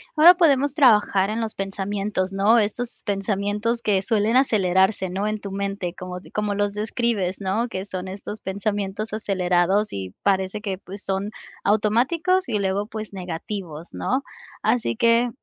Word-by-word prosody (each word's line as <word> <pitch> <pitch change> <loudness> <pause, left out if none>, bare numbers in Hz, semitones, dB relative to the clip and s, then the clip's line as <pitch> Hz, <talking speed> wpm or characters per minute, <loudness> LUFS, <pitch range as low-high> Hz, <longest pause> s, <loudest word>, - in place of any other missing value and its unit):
Ahora 330 +3 +9
podemos 285 -5 +3
trabajar 210 -8 +4
en 220 +2 -2
los 220 -1 -2
pensamientos, 195 0 -2
¿no?, 200 +4 +4
estos 235 +3 -2
pensamientos 205 +3 -1
que 200 -4 +2
suelen 220 +2 +1
acelerarse, 190 -6 +3
¿no?, 195 +3 -2
en 215 0 -2
tu 200 -1 -7
mente 195 -2 -3
como 180 -1 -7
como 210 -1 -1
los 205 0 0
describes, 210 -3 -1
¿no?, 200 +5 0
que 190 -4 -5
son 185 -2 -5
estos 200 +3 -7
pensamientos 200 +1 -3
acelerados 190 -1 +1
y 95 -1 -6
parece 190 +1 +1
que 195 -3 -3
pues 195 +1 -9
son 195 +1 -2 0.3
automáticos 260 - +2
y 220 - +1
luego, 200 +1 0
pues 215 -2 -7
negativos, 180 -2 -6
¿no? 260 +2 -1 0.4
Así 245 -1 +1
que 235 +1 +3
205 Hz, 150 wpm, -23 LUFS, 190-225 Hz, 0.4 s, Ahora